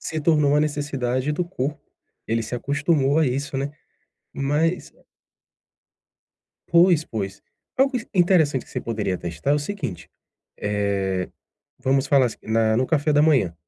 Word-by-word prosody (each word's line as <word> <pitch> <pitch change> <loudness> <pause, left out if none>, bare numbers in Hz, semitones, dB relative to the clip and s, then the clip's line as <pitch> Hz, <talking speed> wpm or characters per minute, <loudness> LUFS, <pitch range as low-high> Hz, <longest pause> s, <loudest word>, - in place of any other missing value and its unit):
se 160 - -4
tornou 150 -2 +3
uma 150 +1 +4
necessidade 145 -3 -1
do 155 +4 -1
corpo, 150 -4 -4 0.5
ele 115 0 0
se 110 - -5
acostumou 140 +2 +1
a 160 - +3
isso, 135 +2 -2
né. 140 +1 -2 0.6
Mas 150 +6 -1 1.8
Pois 170 -2 +5
pois, 100 -6 -5 0.3
algo 265 0 +3
i 235 - -4
interessante 170 -7 +3
que - - -19
você - - -3
poderia 105 -5 -2
testar 85 - -3
é - - +5
o 150 - +2
seguinte: 145 - -5 0.5
eh, 100 -3 -1 0.5
vamos 135 0 +1
falar, 135 -3 +4
assim, 115 - -8
na 110 0 +2
no 130 - +2
café 150 -1 +1
da 145 0 +4
manhã. 140 - +3
140 Hz, 150 wpm, -23 LUFS, 115-155 Hz, 1.8 s, Pois